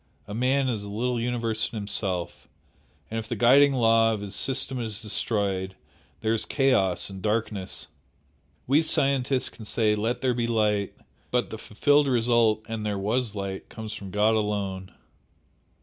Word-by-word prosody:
A 105 Hz, -, -7 dB
man 130 Hz, +4 st, +1 dB
is 115 Hz, -5 st, -1 dB
a 100 Hz, -, -7 dB
little 120 Hz, +4 st, -1 dB
universe 115 Hz, -2 st, -1 dB
in 115 Hz, -, -6 dB
himself 100 Hz, -4 st, -2 dB, 0.6 s
and 115 Hz, -, -2 dB
if 110 Hz, -, -7 dB
the -, -, -3 dB
guiding 140 Hz, +4 st, +5 dB
law 115 Hz, -2 st, +4 dB
of 105 Hz, -, -7 dB
his 100 Hz, -1 st, -6 dB
system 130 Hz, +3 st, 0 dB
is 110 Hz, -3 st, -3 dB
destroyed, 100 Hz, -3 st, -1 dB, 0.5 s
there 110 Hz, 0 st, +1 dB
is 115 Hz, -, +1 dB
chaos 115 Hz, -, +1 dB
and 95 Hz, -1 st, -8 dB
darkness. 105 Hz, -2 st, -1 dB, 0.8 s
We 140 Hz, +5 st, +4 dB
scientists 135 Hz, -4 st, +1 dB
can 110 Hz, -, -13 dB
say 110 Hz, 0 st, +1 dB
'Let 110 Hz, +3 st, -1 dB
there 130 Hz, -1 st, +2 dB
be 120 Hz, -1 st, -1 dB
light,' 105 Hz, -3 st, 0 dB, 0.3 s
but 125 Hz, -1 st, 0 dB
the 110 Hz, -, -6 dB
fulfilled 145 Hz, +8 st, +2 dB
result 115 Hz, -3 st, +2 dB
'and 110 Hz, -1 st, -4 dB
there 105 Hz, -1 st, -2 dB
was 110 Hz, +2 st, -1 dB
light' 100 Hz, -1 st, -5 dB
comes 110 Hz, -1 st, -7 dB
from 100 Hz, -3 st, -7 dB
God 105 Hz, +3 st, +2 dB
alone!" 100 Hz, -3 st, -2 dB
110 Hz, 165 wpm, -26 LUFS, 105-125 Hz, 0.8 s, guiding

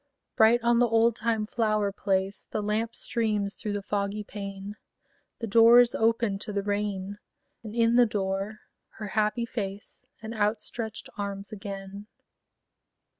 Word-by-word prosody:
Bright 225 Hz, +2 st, +5 dB
on 235 Hz, 0 st, +4 dB
the 245 Hz, -, +5 dB
oldtime 225 Hz, -1 st, +2 dB
flower 215 Hz, -2 st, 0 dB
place 195 Hz, 0 st, -1 dB
The 215 Hz, -, -2 dB
lamp 220 Hz, +2 st, -1 dB
streams 210 Hz, -4 st, -1 dB
through 210 Hz, -3 st, -4 dB
the 205 Hz, -1 st, -3 dB
foggy 205 Hz, +1 st, -2 dB
pane; 200 Hz, 0 st, -7 dB, 0.6 s
The 230 Hz, -, -4 dB
door 230 Hz, +2 st, +7 dB
is 245 Hz, -1 st, +4 dB
opened 225 Hz, -3 st, +1 dB
to -, -, -5 dB
the 200 Hz, -1 st, -1 dB
rain: 205 Hz, -1 st, -2 dB, 0.4 s
And 220 Hz, -1 st, -8 dB
in 230 Hz, 0 st, +3 dB
the 245 Hz, -1 st, +6 dB
door 195 Hz, +1 st, -2 dB, 0.4 s
her 210 Hz, -2 st, -5 dB
happy 215 Hz, +3 st, +1 dB
face 205 Hz, -4 st, -6 dB, 0.2 s
And 220 Hz, +1 st, -7 dB
outstretched 220 Hz, +1 st, -2 dB
arms 200 Hz, 0 st, -4 dB
again. 200 Hz, 0 st, -7 dB
210 Hz, 140 wpm, -27 LUFS, 200-230 Hz, 0.6 s, door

